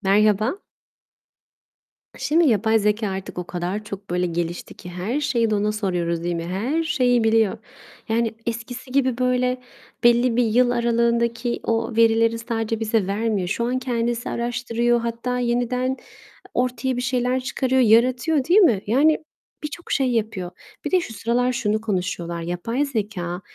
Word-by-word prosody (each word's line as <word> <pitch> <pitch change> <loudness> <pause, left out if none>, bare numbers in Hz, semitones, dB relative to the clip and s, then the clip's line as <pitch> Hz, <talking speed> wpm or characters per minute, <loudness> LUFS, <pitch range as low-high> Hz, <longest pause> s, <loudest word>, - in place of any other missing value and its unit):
Merhaba. 215 - +2 1.5
K - - -15
şimdi 325 +2 +3
yapay 220 0 +3
zekâ, 210 0 +1
artık 190 -1 -6
o - - -3
kadar 180 +4 -3
çok, 200 -1 -8
böyle, 180 +1 0
gelişti 170 0 -3
ki 180 - -11
her 185 +10 -2
şeyi 240 -6 +1
de 215 - +1
ona 210 +1 +1
soruyoruz, 175 -5 -1
değil 175 0 -1
mi? 165 0 -4
Her 230 - -1
şeyi 250 -7 +2
biliyor, 225 -1 +3 0.5
yani, 225 0 +1
eskisi 235 +2 -5
gibi 260 -2 +1
böyle 250 0 +1 0.4
belli 240 0 +4
bir 245 - +3
yıl 240 +2 +3
aralığındaki 235 0 +1
o 230 0 -1
verileri 230 0 +4
sadece 225 -1 -2
bize 220 -3 0
vermiyor. 205 -2 -1
Şu 215 +5 -1
an 250 +2 0
kendisi 240 -2 -2
araştırıyor, 240 0 0
hatta 235 +2 -2
yeniden 250 +2 0 0.6
ortaya 250 +1 -1
bir - - -1
şeyler 250 0 0
çıkarıyor, 260 0 0
yaratıyor, 250 +6 +3
değil 360 +7 +5
mi? 240 - +4
Yani, 290 +8 +4 0.5
birçok 305 +3 -7
şey 265 -3 +2
yapıyor. 215 -6 -2 0.3
Bir - - -2
de 370 -1 +4
şu 235 - -7
sıralar 240 +3 0
şunu 215 -2 0
konuşuyorlar, 180 -5 -2
yapay 180 +11 -2
zekâ 200 -8 -3
230 Hz, 155 wpm, -23 LUFS, 210-250 Hz, 1.5 s, değil